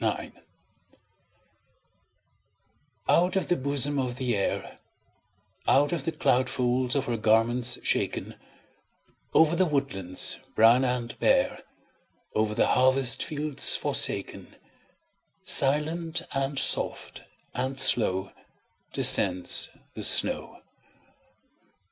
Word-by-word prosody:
SNOW - - -1
FLAKES - - -11 2.8
Out 180 +3 +1
of 190 - -2
the 175 - +2
bosom 140 0 -1
of 125 -2 -4
the 125 -3 -2
Air, 100 - -4 0.9
Out 145 +2 +2
of 165 -5 -4
the 165 - -2
cloud 130 -4 -1
folds 125 0 -1
of 140 -1 -1
her 120 -1 -3
garments 115 +3 +1
shaken, - - -3 1.0
Over 160 +1 +3
the 185 +1 0
woodlands 115 - -1 0.2
brown 115 +4 +4
and 125 -2 -3
bare, - - 0 0.7
Over 110 0 -2
the - - 0
harvest 130 -1 +1
fields 150 -2 +2
forsaken, - - -3 0.9
Silent, 160 +4 +3
and 135 +1 -4
soft, - - 0 0.3
and 130 +2 -4
slow 95 -7 +3 0.6
Descends 90 -1 +3 0.2
the - - -9
snow. - - +2
130 Hz, 100 wpm, -25 LUFS, 120-145 Hz, 2.8 s, brown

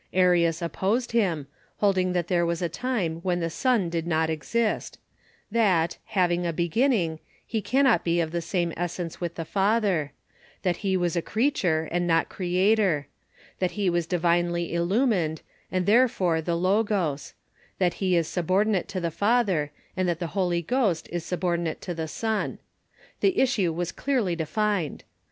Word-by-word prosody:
Arius 175 -2 +3
opposed 205 +8 -1
him, 185 -11 +1 0.3
hold 200 -2 +3
ing 185 0 +1
that 175 -1 0
there 175 -1 +2
was 170 +1 -1
a - - +2
time 180 -3 -2
when 175 +1 -1
the 165 -1 -2
Son 240 -2 +1
did 165 0 -3
not 160 -1 +1
exist; 215 +8 -1 0.5
that, 185 -7 +2
having 175 -3 +1
a 170 - 0
beginning, 170 - +1 0.3
he 220 -1 -2
cannot 265 +3 +3
be 170 0 +1
of 160 -2 -1
the 170 0 -2
same 170 -1 -1
essence 175 0 -4
with 170 -1 -3
the 165 - -4
Father; 195 -6 +1 0.5
that 180 -2 +1
he 190 -2 0
was 175 -2 0
a 170 - +1
creature, 185 - 0
and 175 +1 0
not 165 -1 +2
Creator; 185 -3 +1 0.5
that 185 -1 0
he 200 -4 +1
was 170 -1 0
divinely 175 -1 +1
illumined, 175 - +1 0.3
and 185 -1 0
therefore 200 -7 +3
the 170 +1 -1
Logos; 185 -5 0 0.4
that 180 -3 +2
he 185 -2 +2
is 165 -2 +2
subordinate 190 +3 +1
to 200 -2 -4
the 170 -2 -2
Father, 200 -6 +1 0.3
and 185 -1 0
that 170 - 0
the 165 -3 -5
Holy 175 -3 0
Ghost 205 -4 0
is 175 -1 -3
subordi 175 -1 -1
nate 165 -2 -3
to 180 - -4
the 160 -1 -4
Son. 220 +6 -2 0.6
The 385 -2 +2
issue 215 -10 +2
was 175 +1 -3
clearly 245 -11 0
defined. 180 0 -1
175 Hz, 165 wpm, -26 LUFS, 170-205 Hz, 0.6 s, Arius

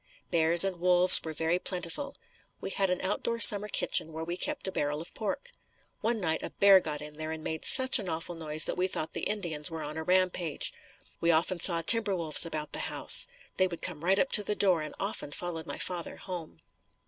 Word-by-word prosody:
Bears 170 0 +5
and 190 -3 -5
wolves 180 +1 +8
were 160 - -8
very 165 +3 -3
plentiful. 180 - -6 0.4
We - - -8
had 195 -1 -3
an 180 - -4
outdoor 230 +4 -4
summer 210 -2 +9
kitchen 160 -5 -1
where 160 +1 -8
we 170 +2 -7
kept 290 +3 -4
a - - -5
barrel 145 -3 -4
of 165 - -11
pork. 485 - -7 0.5
One 230 0 -4
night 160 -4 -4
a - - -8
bear 200 -1 +3
got 150 -4 -8
in 150 0 -11
there 155 +1 -8
and 160 -1 -9
made 160 -1 -6
such 260 -1 +6
an 195 -4 -8
awful 165 +2 -7
noise 155 -2 0
that - - -6
we 185 - -1
thought 160 -4 -7
the - - -6
Indians 175 -7 -3
were 160 -1 -9
on 150 +1 -9
a 160 - -6
rampage. 180 -3 -2 0.5
We 170 - -2
often 170 +2 -1
saw 170 -1 +4
timber 215 +1 +6
wolves 165 -1 -1
about 155 -2 -7
the - - 0
house. - - +4 0.3
They 185 - 0
would 170 -2 -11
come 165 -4 -8
right 190 +3 0
up 270 - -2
to 210 - +3
the 210 - -5
door 185 -6 0
and 155 -1 -10
often 195 -7 -6
followed 165 -2 -8
my - - -7
father 175 -2 -7
home. 170 - -11
175 Hz, 220 wpm, -26 LUFS, 160-195 Hz, 0.5 s, summer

